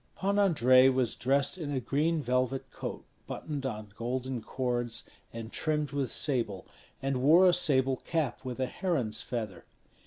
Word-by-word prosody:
Pan 200 +1 0
Andrei 130 -9 +6
was 130 -3 +1
dressed 140 +7 +1
in 155 -4 -4
a 140 -2 -1
green 150 +5 0
velvet 130 +1 -1
coat - - -6 0.2
buttoned 140 -3 -4
on 105 -4 -6
golden 125 +1 -3
cords 120 -1 -2 0.2
and 115 0 -7
trimmed 150 -3 -1
with 140 -2 -1
sable, 115 -9 0 0.4
and 135 -1 0
wore 165 +7 +7
a 180 - +5
sable 135 -6 +2
cap 160 -3 -2
with 130 -1 -5
a 130 - +1
heron's 130 - -1
feather. 110 -8 -5
130 Hz, 155 wpm, -30 LUFS, 120-150 Hz, 0.4 s, wore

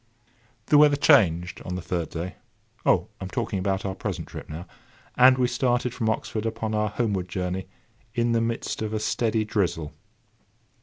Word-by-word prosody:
The 145 - +5
weather 150 -1 +6
changed 90 - +3
on 90 - -4
the 90 - -4
third 85 -3 -2
day,—Oh! 85 +3 -2
I - - -6
am - - -6
talking 115 -3 -2
about 95 +1 -1
our 95 - -1
present - - -4
trip - - -9
now,—and 125 +9 +1
we 125 - +3
started 125 0 0
from 110 - -1
Oxford 110 0 -2
upon 110 -1 -3
our 105 0 +1
homeward 100 -5 -1
journey 90 +1 -3 0.5
in 120 -1 +2
the 115 0 +2
midst 115 -1 -2
of 110 0 -2
a - - 0
steady 110 0 0
drizzle. 85 -7 -1
110 Hz, 165 wpm, -25 LUFS, 90-120 Hz, 0.5 s, weather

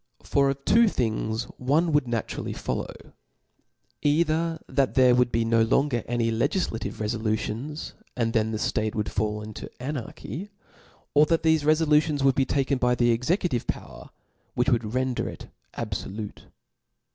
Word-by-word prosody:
For 140 -1 +2
of 135 0 -4
two 230 +1 +5
things 110 - -1 0.2
one 150 +6 +2
wouW 145 -3 +3
na 115 -2 0
turally - - -5
follow, - - -5 0.9
either 160 +2 +2
that 135 -2 +1
there 130 -2 +6
would 125 -1 +3
be 115 0 +1
no 115 0 +3
lon 135 +6 +2
ger 120 -2 -1
any 115 -1 0
legiflative 115 - -1
refolutions, 110 +6 -2 0.2
and 115 -2 0
then 110 -2 +2
the 110 - -2
flate 110 0 -1
would 105 -1 -2
fall 105 0 -1
into 105 0 -8
anarchy 145 - -5
•, - - -21 0.6
or 150 +1 +5
that 165 0 +1
thefe 160 -2 +3
refolutions 150 -1 +3
would 135 -1 +5
be 135 0 +2
taken 135 -1 0
by 125 0 +3
the 120 -1 +3
executive 125 - 0
power, 65 -2 -6 0.5
which 125 +2 +2
would 115 -2 0
render 130 -1 0
it - - -10 0.3
abfolute. 105 +1 -5
125 Hz, 155 wpm, -26 LUFS, 115-150 Hz, 0.9 s, there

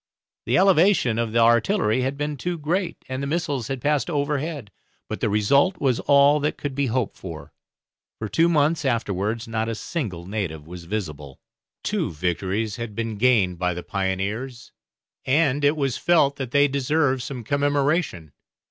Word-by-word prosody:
The 125 +3 +3
elevation 180 - +4
of 115 -1 -1
the 115 - 0
artillery 115 - +3
had 135 +2 -2
been 145 0 -2
too 175 +5 -3
great, 170 +4 -2
and 130 +1 -4
the 140 - -2
missiles 145 -6 -2
had 135 -3 -4
passed 150 +2 +1
overhead; 145 -5 -2 0.4
but - - -5
the - - 0
result 140 - +3
was 130 -4 +1
all 140 +1 +5
that 150 +1 -1
could 145 -2 -4
be 140 0 0
hoped 125 -2 -1
for, 80 -5 -9 0.6
for 110 - -4
two 165 - +2
months 155 0 +2
afterwards 115 -2 -1
not 110 0 -2
a 115 - -2
single 105 - -4
native 90 -7 -4
was 85 +1 -10
visible. 75 -8 -5 0.4
Two - - -1
victories 95 +7 -2
had 115 -3 -6
been 115 -2 -3
gained 105 -8 +3
by 90 -1 0
the 90 - -6
pioneers, 100 +6 -3 0.5
and 145 0 +2
it 145 +2 +3
was 135 -4 0
felt 145 -5 +3
that 130 -3 -4
they 140 +3 +4
deserved 140 0 +1
some 125 -1 -6
commemoration. 140 - 0
130 Hz, 165 wpm, -23 LUFS, 105-145 Hz, 0.6 s, all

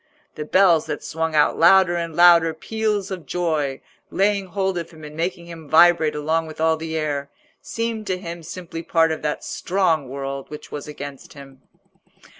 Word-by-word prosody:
The 150 - -6
bells 175 -2 +4
that 150 -1 -4
swung 160 0 -3
out 150 -1 +3
louder 175 +1 +6
and 170 -2 -4
louder 170 -2 +6
peals 210 +1 -2
of 180 -4 -6
joy, 155 -6 -1 0.3
laying 200 0 +1
hold 190 -1 -1
of 170 - -7
him 160 -2 -15
and 150 0 -9
making 170 +1 -3
him 165 -3 -11
vibrate 160 -1 +5
along 160 +2 -1
with 155 - -11
all 160 0 +3
the 160 0 -4
air, 145 -2 -2 0.3
seemed 230 -2 -4
to 185 -1 -1
him 170 -2 -7
simply 165 0 -7
part 165 -1 +2
of 160 - -4
that 150 -1 -3
strong 170 -7 0
world 135 0 -5
which 150 - -10
was 145 0 -6
against 145 -2 -9
him. 135 -2 -14
165 Hz, 180 wpm, -22 LUFS, 150-180 Hz, 0.3 s, louder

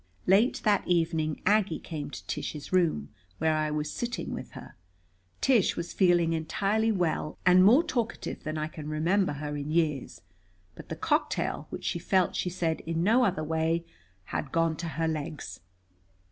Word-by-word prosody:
Late 210 +7 +3
that 210 -3 +2
evening 165 -3 0
Aggie 205 -6 +3
came 150 -4 -6
to - - -9
Tish's 150 +3 -5
room, 165 - +2 0.3
where 160 0 +2
I 155 0 0
was 150 0 -2
sitting 240 0 -3
with - - -7
her. - - -11 0.7
Tish 245 -8 +3
was 170 - -4
feeling 175 -3 +3
entirely 200 +7 0
well, 170 -5 -1
and 180 0 +7
more 245 - +7
talkative 240 -8 -3
than 155 0 -3
I 155 - -1
can 155 -1 -8
remember 170 +4 +1
her 145 +1 -4
in 145 0 -4
years. 155 -4 0 0.5
But - - -12
the - - -3
cocktail, - - -1
which - - -7
she 170 - -1
felt, 185 0 +1
she 180 - -1
said, 170 -2 -1
in 165 0 0
no 230 +6 +4
other 185 -8 +1
way, 160 +2 0 0.4
had 135 +8 -4
gone 165 -1 +1
to 170 - -4
her 160 +1 -1
legs. 155 -1 -4
165 Hz, 170 wpm, -28 LUFS, 155-190 Hz, 0.7 s, and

